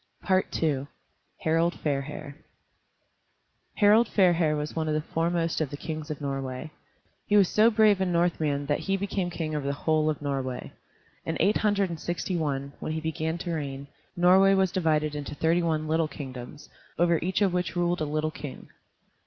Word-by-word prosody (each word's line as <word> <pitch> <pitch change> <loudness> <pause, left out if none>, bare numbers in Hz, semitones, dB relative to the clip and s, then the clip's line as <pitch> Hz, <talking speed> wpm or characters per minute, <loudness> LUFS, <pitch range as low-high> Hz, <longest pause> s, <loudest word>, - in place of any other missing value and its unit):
II 160 -7 +1 0.6
HARALD 165 +2 +2
FAIRHAIR 140 -1 -3 1.4
Harald 215 +3 +5
Fairhair 175 -7 +3
was 150 0 -4
one 160 -1 -1
of 155 - 0
the 155 - +1
foremost 165 +1 -1
of 155 - -1
the 145 - -6
kings 155 0 -5
of 150 - -4
Norway. 135 +1 -4 0.6
He 210 - +4
was 195 -3 +6
so 215 +4 +4
brave 215 -3 +4
a - - +2
Northman 160 -5 +1
that 145 +1 0
he 195 0 -1
became 195 -2 -2
king 160 -3 -3
over 145 -2 -2
the 140 - 0
whole 155 -1 +3
of 155 - -2
Norway. 135 -3 -3 0.5
In - - -3
eight 205 - +3
hundred 200 -3 +1
and 165 - -5
sixty 175 +3 -3
one, 140 -4 -2
when 155 - -3
he 160 - -2
began 160 +1 -2
to 175 0 -4
reign, 140 -3 -4 0.3
Norway 190 +2 +6
was 190 -2 +2
divided 155 -4 +1
into 145 0 -5
thirty 165 +4 +2
one 155 -2 0
little 160 0 +1
kingdoms, 135 -2 -9 0.3
over 170 -1 +3
each 185 +4 +1
of 190 -3 +2
which 180 -1 -1
ruled 175 -1 0
a - - +1
little 155 +1 -1
king. 145 -3 -9
160 Hz, 180 wpm, -27 LUFS, 150-180 Hz, 1.4 s, was